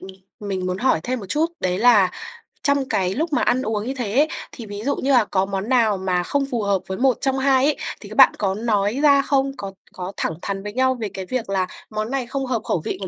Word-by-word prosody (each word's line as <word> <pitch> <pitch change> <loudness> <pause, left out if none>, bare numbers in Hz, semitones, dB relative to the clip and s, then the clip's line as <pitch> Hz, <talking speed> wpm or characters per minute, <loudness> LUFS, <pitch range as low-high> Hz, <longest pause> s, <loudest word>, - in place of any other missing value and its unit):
ừm, 190 - -10 0.4
mình 185 -2 -2
muốn 185 0 -2
hỏi 255 -9 +2
thêm 250 +3 -2
một 195 - -8
chút 310 - +2
đấy 180 0 0
là 215 -5 +5 0.5
trong 280 -2 +1
cái 185 -1 +1
lúc 315 +4 -2
mà - - +2
ăn 255 +1 +2
uống 215 -2 -2
như 265 - -1
thế 225 -1 -2
ấy, 300 +2 +5 0.2
thì 235 - -9
ví 205 0 -7
dụ 285 - +1
như 275 - -1
là 245 -5 +5
có 190 -1 0
món 195 +2 -4
nào 230 -6 +3
mà 180 -1 0
không 280 +7 0
phù 235 -3 -1
hợp 200 -1 +1
với 190 - -4
một 260 -1 +2
trong 270 -1 +1
hai 265 -1 +3
ấy 300 0 +2 0.2
thì - - -10
các - - -8
bạn - - +8
có 195 -2 0
nói 215 +2 0
ra 280 -2 +6
không? 275 -1 +1
Có 195 -1 -6 0.2
có 185 +1 -6
thẳng 160 - -1
thắn 195 -1 -4
với 210 0 -6
nhau 260 0 +2
về 215 - -2
cái 190 - -5
việc 230 0 -3
là 190 -2 0 0.2
món 215 +2 -3
này 265 -3 -2
không 270 +1 -3
hợp 245 -4 -1
khẩu 165 - -1
vị - - -2
của 190 - -3
225 Hz, 270 wpm, -22 LUFS, 195-265 Hz, 0.5 s, bạn